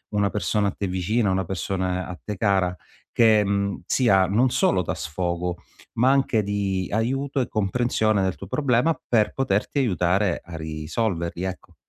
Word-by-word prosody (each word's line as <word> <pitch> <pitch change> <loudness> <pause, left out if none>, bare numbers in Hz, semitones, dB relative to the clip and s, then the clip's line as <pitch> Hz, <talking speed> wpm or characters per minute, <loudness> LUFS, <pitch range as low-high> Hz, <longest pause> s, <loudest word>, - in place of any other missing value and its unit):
una 100 -1 +2
persona 100 +1 0
a - - 0
te 100 - -3
vicina, 95 +4 0
una 95 -1 0
persona 90 0 -2
a 90 -1 -8
te 105 -3 -5
cara, 95 -4 +1 0.4
che, 110 -2 +5
mhmm, 100 0 -1
sia 100 -7 +3
non 120 +7 +3
solo 175 - +2
da - - -3
sfogo 85 +2 -3 0.4
ma 130 +2 +5
anche 135 -5 +2
di 100 -2 -2
aiuto 135 +6 -1
e 125 - 0
comprensione 110 0 +1
del 95 -1 0
tuo 95 - -9
problema 140 - +1
per 110 -3 +2
poterti 130 0 -1
aiutare 95 -4 +1
a 85 -1 -10
risolverli, 85 +3 -3
ecco. 95 -1 -6
100 Hz, 160 wpm, -24 LUFS, 90-115 Hz, 0.4 s, che